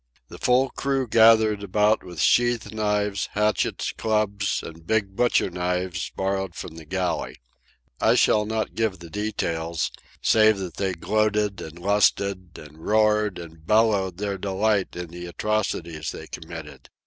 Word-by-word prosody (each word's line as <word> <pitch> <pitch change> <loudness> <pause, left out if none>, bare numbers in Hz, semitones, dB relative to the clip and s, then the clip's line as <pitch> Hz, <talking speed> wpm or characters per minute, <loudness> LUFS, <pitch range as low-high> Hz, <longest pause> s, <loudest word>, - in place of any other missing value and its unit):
The - - -11
full 130 +2 +3
crew 135 -2 -1
gathered 110 -2 +5
about 105 +2 +2
with 90 -2 -9
sheath 120 -2 +2
knives, 105 -2 -1
hatchets, 105 +1 0
clubs, 105 -2 0
and 80 0 -11
big 105 -3 0
butcher 120 -5 +2
knives 90 +1 -2
borrowed 95 -2 -2
from 80 - -7
the 80 - -10
galley. 95 +2 -2 0.6
I - - +4
shall 105 0 +3
not 110 0 -2
give 110 -4 -1
the 85 -1 -12
details, 85 -6 -2 0.3
save 110 -1 +4
that 95 -3 -6
they 95 -2 -1
gloated 105 +2 0
and 80 +1 -9
lusted, 100 -1 +1
and 75 +1 -13
roared 105 +1 +2
and 80 -2 -11
bellowed 100 -2 +2
their 100 -1 -3
delight 100 +1 0
in 90 -1 -6
the 90 +1 -8
atrocities 85 -5 -2
they - - -7
committed. - - -9
100 Hz, 145 wpm, -24 LUFS, 90-110 Hz, 0.6 s, gathered